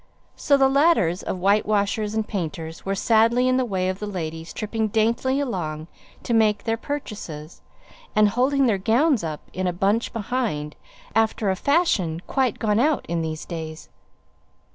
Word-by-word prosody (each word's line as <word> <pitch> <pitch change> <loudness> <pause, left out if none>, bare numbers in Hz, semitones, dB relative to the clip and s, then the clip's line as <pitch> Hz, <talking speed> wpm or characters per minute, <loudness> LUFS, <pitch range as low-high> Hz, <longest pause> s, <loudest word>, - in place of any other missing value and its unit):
So 280 - +3
the 270 -1 +5
ladders 270 - +3
of - - -4
whitewashers 205 +2 +1
and 220 -1 -1
painters 165 -4 -5
were 195 0 -1
sadly 230 +4 +3
in 255 0 +3
the 260 - +2
way 190 -5 -1
of 185 +1 -2
the 210 - -4
ladies 165 -4 -5
tripping 220 0 -2
daintily 230 +5 +1
along 165 - -3 0.3
to 235 - -2
make 215 -2 +3
their 225 - 0
purchases, 205 - -7 0.5
and 215 -1 +5
holding 265 +5 +2
their 215 -6 +2
gowns 240 - +2
up 155 -2 -4
in 185 0 -2
a - - +1
bunch 200 +6 0
behind, 210 -10 -2 0.4
after 220 -2 +1
a - - 0
fashion 200 - +1
quite 260 -5 0
gone 210 -1 +1
out 295 +2 +2
in 170 0 -1
these 160 -1 -4
days. 160 -2 -7
210 Hz, 165 wpm, -23 LUFS, 175-240 Hz, 0.5 s, the